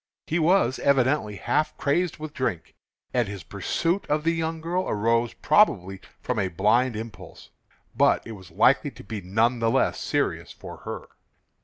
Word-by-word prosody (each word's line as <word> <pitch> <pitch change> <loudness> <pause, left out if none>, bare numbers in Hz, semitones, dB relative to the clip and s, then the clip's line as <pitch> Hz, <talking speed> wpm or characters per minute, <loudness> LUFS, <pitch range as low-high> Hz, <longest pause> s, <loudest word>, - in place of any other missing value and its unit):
He 165 - 0
was 170 -3 +3
evidently 130 -5 +2
half 155 +9 -1
crazed 170 +4 0
with 155 -1 -7
drink, 125 - -3 0.4
and 120 -3 +1
his 100 -3 -7
pursuit 170 - -1
of 150 +1 0
the 165 +1 +2
young 165 0 -2
girl 175 +3 -2
arose 115 +2 +1
probably 95 - +2 0.2
from 125 -3 -2
a 95 - +1
blind 110 +7 +2
impulse; 110 -3 -9 0.4
but - - +3
it 115 - -8
was 95 -5 -11
likely - - +3
to - - -13
be 105 0 -6
none 110 +7 +1
the 115 0 +2
less - - +1
serious - - -1
for - - -10
her. - - -7
120 Hz, 165 wpm, -25 LUFS, 105-155 Hz, 0.4 s, was